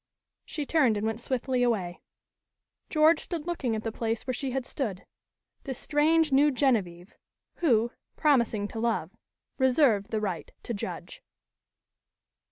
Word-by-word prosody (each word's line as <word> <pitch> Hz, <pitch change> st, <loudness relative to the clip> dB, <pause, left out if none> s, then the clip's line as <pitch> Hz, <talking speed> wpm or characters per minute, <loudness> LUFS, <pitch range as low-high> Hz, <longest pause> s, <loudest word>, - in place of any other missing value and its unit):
She 295 Hz, -, -4 dB
turned 265 Hz, -9 st, +3 dB
and 205 Hz, -, -2 dB
went 225 Hz, 0 st, -1 dB
swiftly 255 Hz, 0 st, -1 dB
away. 195 Hz, -8 st, 0 dB, 0.9 s
George 310 Hz, +1 st, +5 dB
stood 330 Hz, -4 st, -5 dB
looking 285 Hz, -10 st, -1 dB
at 215 Hz, -, -4 dB
the 225 Hz, -, -2 dB
place 225 Hz, 0 st, -2 dB
where 255 Hz, -, -1 dB
she 270 Hz, +2 st, -3 dB
had 260 Hz, 0 st, -2 dB
stood, 215 Hz, -11 st, -4 dB, 0.6 s
this 265 Hz, -3 st, -5 dB
strange, 310 Hz, +1 st, +2 dB
new 285 Hz, +3 st, +5 dB
Genevieve, 210 Hz, -10 st, 0 dB, 0.4 s
who, 240 Hz, -8 st, +2 dB, 0.2 s
promising 235 Hz, -8 st, +2 dB
to 225 Hz, -, -6 dB
love, 220 Hz, -7 st, -1 dB, 0.5 s
reserved 255 Hz, -6 st, +3 dB
the 220 Hz, -, -1 dB
right 190 Hz, -6 st, -4 dB
to 235 Hz, -, -4 dB
judge. 200 Hz, -, -6 dB
245 Hz, 140 wpm, -28 LUFS, 220-285 Hz, 0.9 s, George